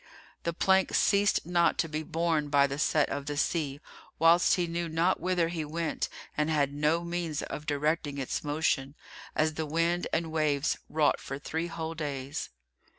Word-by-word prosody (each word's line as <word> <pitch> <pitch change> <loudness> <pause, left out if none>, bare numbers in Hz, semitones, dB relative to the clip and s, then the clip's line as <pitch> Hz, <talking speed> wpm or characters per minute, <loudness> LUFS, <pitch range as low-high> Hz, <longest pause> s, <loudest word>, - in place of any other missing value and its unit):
The 170 - +1
plank 190 +2 +3
ceased 200 -4 +3
not 170 0 +2
to 165 - +1
be 155 0 -3
borne 160 -2 0
by 140 -1 +5
the 140 +1 -4
set 150 -1 +3
of 140 -1 -4
the 145 -1 -3
sea, 145 -3 0 0.4
whilst 165 +2 +5
he 180 - 0
knew 170 0 -3
not 165 +4 +1
whither 175 -2 +1
he 165 -2 -3
went 160 +1 -2 0.3
and 150 +1 +1
had 145 -3 +1
no 150 +4 +1
means 170 -3 -3
of 150 0 -6
directing 150 0 0
its 135 -2 -3
motion, 145 -2 0 0.4
as 155 0 +2
the 155 0 -3
wind 165 +3 +1
and 165 -1 -1
waves 155 -1 +1
wrought 150 -2 +2
for 135 - -6
three 160 +4 -3
whole 165 -1 -4
days. 145 -2 -4
160 Hz, 175 wpm, -29 LUFS, 145-170 Hz, 0.4 s, by